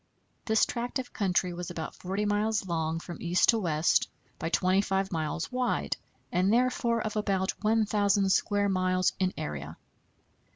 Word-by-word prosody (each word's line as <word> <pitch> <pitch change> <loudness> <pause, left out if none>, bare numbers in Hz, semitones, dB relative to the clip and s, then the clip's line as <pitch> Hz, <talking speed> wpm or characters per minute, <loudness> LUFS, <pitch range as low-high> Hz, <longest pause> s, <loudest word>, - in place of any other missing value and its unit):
This 220 -1 +3
tract 240 +2 -3
of 260 -1 -6
country 180 -2 0
was 175 0 -5
about 165 -2 -5
40 195 +3 -3
miles 205 0 +1
long 165 -2 -1
from 175 0 -9
east 175 0 +2
to 230 - +5
west 160 -4 +2 0.3
by 165 - -2
25 190 +2 +1
miles 160 - -2
wide, 250 0 0 0.4
and 185 +3 +2
therefore 235 -1 +2
of 215 0 -4
about 195 -3 0
1,000 205 -2 +2
square 205 +1 +2
miles 185 -1 +1
in 185 -1 +1
area. 75 +1 -5
190 Hz, 150 wpm, -29 LUFS, 175-215 Hz, 0.4 s, to